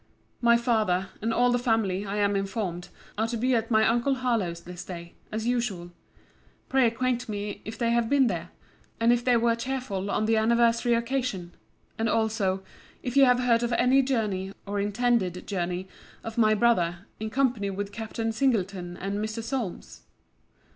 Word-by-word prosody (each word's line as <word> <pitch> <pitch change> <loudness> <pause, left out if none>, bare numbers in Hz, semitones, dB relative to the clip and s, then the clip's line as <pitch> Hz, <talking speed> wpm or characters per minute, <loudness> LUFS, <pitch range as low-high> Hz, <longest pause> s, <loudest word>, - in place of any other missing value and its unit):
My 235 -1 +5
father, 215 -6 +1
and 225 +2 0
all 245 +2 +3
the 245 - +2
family, 215 -5 0
I 200 +1 -3
am 205 -1 +2
informed, 195 -3 -3 0.3
are 220 - +2
to 235 0 -3
be 255 +3 +1
at 230 -1 0
my 220 -2 +4
uncle 240 +4 +2
Harlowe's 225 -10 -1
this 180 +1 -8
day, 170 -2 -8 0.2
as 220 +1 -3
usual. 235 -8 -1 0.8
Pray 265 -2 +4
acquaint 245 +1 -1
me, 205 0 -4
if 215 - -6
they 235 -1 +1
have 235 -1 +1
been 280 -2 +4
there? 175 -6 -2 0.5
And 230 +1 +5
if 240 0 0
they 245 -1 +4
were 230 0 +2
cheerful 230 -6 -3
on 215 - 0
the 225 0 +2
anniversary 235 +1 +3
occasion? 235 -7 -2 0.5
And 225 0 +1
also, 210 -4 0 0.4
if 250 -1 -4
you 275 -1 +7
have 250 -1 +4
heard 235 -2 +3
of 240 0 -1
any 260 +3 +4
journey, 210 -8 -1
or 200 0 -2
intended 205 -3 0
journey, 180 -1 -3 0.4
of 225 0 -6
my 215 -2 +4
brother, 195 -5 +2
in 220 0 -3
company 240 -5 +1
with 200 +1 -4
Captain 225 +2 -3
Singleton 195 -7 -1
and 200 +2 -3
Mr. 220 +1 -4
Solmes? 230 -6 -4
225 Hz, 175 wpm, -27 LUFS, 195-240 Hz, 0.8 s, you